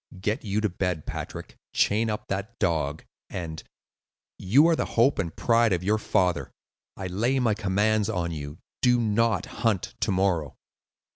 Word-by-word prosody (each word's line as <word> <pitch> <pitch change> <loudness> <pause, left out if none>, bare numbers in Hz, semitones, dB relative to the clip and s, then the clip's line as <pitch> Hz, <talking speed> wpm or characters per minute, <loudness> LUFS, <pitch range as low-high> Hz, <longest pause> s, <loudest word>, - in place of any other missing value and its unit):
"Get 105 +6 -1
you 105 0 -1
to 105 - +1
bed, 90 -3 -2
Patrick, - - -7
chain 110 +2 +2
up 105 - -4
that 100 +4 -4
dog, 80 -5 -1 0.2
and—you 90 - -2
are 170 - +4
the - - -1
hope 120 +2 +4
and 85 -5 -2
pride 115 -3 +3
of 90 0 -1
your 105 +3 +2
father—I 90 0 -2
lay 110 +9 0
my 120 -4 +2
commands 105 +1 +1
on 85 -6 -1
you—do 80 - -1
not 110 -3 +1 0.2
hunt 110 -6 0
to - - 0
morrow." 90 -6 0
100 Hz, 145 wpm, -26 LUFS, 90-115 Hz, 0.2 s, are